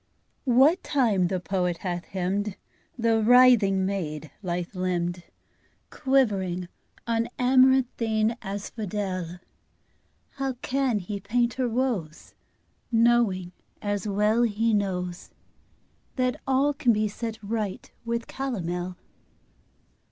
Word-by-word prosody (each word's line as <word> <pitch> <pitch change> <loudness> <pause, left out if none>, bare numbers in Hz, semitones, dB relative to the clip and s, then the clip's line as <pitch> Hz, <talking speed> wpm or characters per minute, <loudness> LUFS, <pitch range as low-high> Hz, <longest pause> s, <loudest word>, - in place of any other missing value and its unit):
What 275 +9 +5
time 220 - +2
the 185 0 -1
poet 180 -1 -1
hath 175 -1 -2
hymned 195 +2 -2 0.4
The 225 -1 +2
writhing 225 -5 +5
maid, 155 -6 -3
lithe 175 -1 -3
limbed, 180 -1 -1 0.7
Quivering 195 -10 +1 0.4
on 230 0 0
amaranthine 250 -4 +3
asphodel, 195 -3 -4 1.0
How 270 -1 -1
can 265 -3 +1
he 200 +1 -4
paint 235 +4 0
her 255 -2 -1
woes, 225 -11 -2 0.6
Knowing, 225 -6 +3 0.3
as 205 -1 -2
well 210 +3 +2
he 225 0 +1
knows, 180 -3 -2 0.9
That 255 -1 0
all 270 +2 +3
can 265 -5 +2
be 215 0 +1
set 225 +2 -5
right 210 -2 -3
with 235 0 -2
calomel? 180 -9 -4
210 Hz, 100 wpm, -26 LUFS, 185-240 Hz, 1.0 s, What